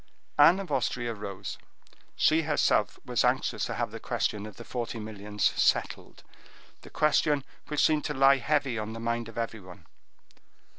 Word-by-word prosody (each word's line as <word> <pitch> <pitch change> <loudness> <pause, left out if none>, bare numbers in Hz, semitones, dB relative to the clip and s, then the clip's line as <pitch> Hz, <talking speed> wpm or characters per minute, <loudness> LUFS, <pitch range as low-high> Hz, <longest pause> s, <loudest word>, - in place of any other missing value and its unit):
Anne 165 +6 +7
of 195 -5 -6
Austria 120 -3 -1
rose; 100 -3 -7 0.6
she 160 +1 +3
herself 150 -2 +1
was - - +1
anxious - - +1
to - - -4
have - - -2
the - - -7
question 105 0 -2
of 105 - -11
the 115 - -9
forty 120 -1 -4
millions 105 -1 -6
settled—the - - -3
question 150 -2 +2 0.2
which 150 0 +2
seemed 155 -1 +2
to 150 - -2
lie 135 +1 +6
heavy 140 -3 0
on 110 +1 -5
the 115 - -7
mind 115 0 -2
of 115 - -12
everyone. 100 -6 -6
120 Hz, 155 wpm, -28 LUFS, 110-145 Hz, 0.6 s, Anne